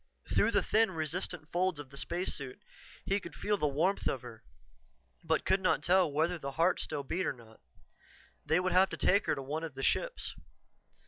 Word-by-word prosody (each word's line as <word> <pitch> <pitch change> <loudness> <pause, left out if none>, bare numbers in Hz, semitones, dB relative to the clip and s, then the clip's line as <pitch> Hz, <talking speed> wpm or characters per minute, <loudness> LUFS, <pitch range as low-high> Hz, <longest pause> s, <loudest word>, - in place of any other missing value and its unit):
Through - - +4
the - - +2
thin, 225 0 +3
resistant 165 0 -3
folds 180 -1 +1
of 140 -2 -9
the - - -12
spacesuit, 140 -4 -3 0.4
he 195 +1 +1
could 170 -5 -10
feel 210 0 0
the 150 - 0
warmth 165 +8 0
of 130 - -1
her, 115 -3 -11 0.8
but 160 -1 0
could 190 0 +3
not 185 - +2
tell 180 -3 +4
whether 165 +4 0
the 140 -2 -5
heart 170 +5 +2
still 150 -2 -2
beat 180 +7 -1
or - - 0
not. 115 -3 -17 0.8
They 160 - +2
would 185 0 0
have 185 +1 +5
to - - -5
take 200 +2 +3
her - - +2
to 135 - -5
one 150 +4 -3
of 160 -5 -6
the 135 - -5
ships. - - 0
165 Hz, 200 wpm, -32 LUFS, 140-185 Hz, 0.8 s, have